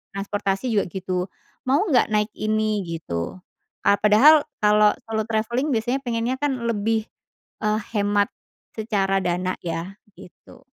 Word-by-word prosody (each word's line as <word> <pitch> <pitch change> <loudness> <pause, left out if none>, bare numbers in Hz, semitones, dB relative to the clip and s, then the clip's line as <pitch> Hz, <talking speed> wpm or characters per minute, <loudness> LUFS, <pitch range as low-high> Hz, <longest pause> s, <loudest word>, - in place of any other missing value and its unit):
transportasi 200 +3 -2
juga 205 - +2
gitu, 185 -1 -3 0.4
"Mau 285 +9 +3
nggak 260 -5 +4
naik 210 0 +1
ini?" 215 -1 0
Gitu, 160 - -4 0.5
eee, 200 - +5
padahal 285 +9 +6 0.2
kalau 210 0 +5 0.2
solo 220 -1 0
travelling 235 +6 0
biasanya 240 +4 0
pengennya 235 +1 -1
kan 270 -4 -1
lebih, 220 0 0 0.6
eee, 215 0 +1 0.2
hemat 205 0 +2 0.5
secara 200 -3 0
dana 180 +1 -1
ya, 170 +4 -4 0.2
gitu. 180 - -16
210 Hz, 130 wpm, -23 LUFS, 195-230 Hz, 0.6 s, padahal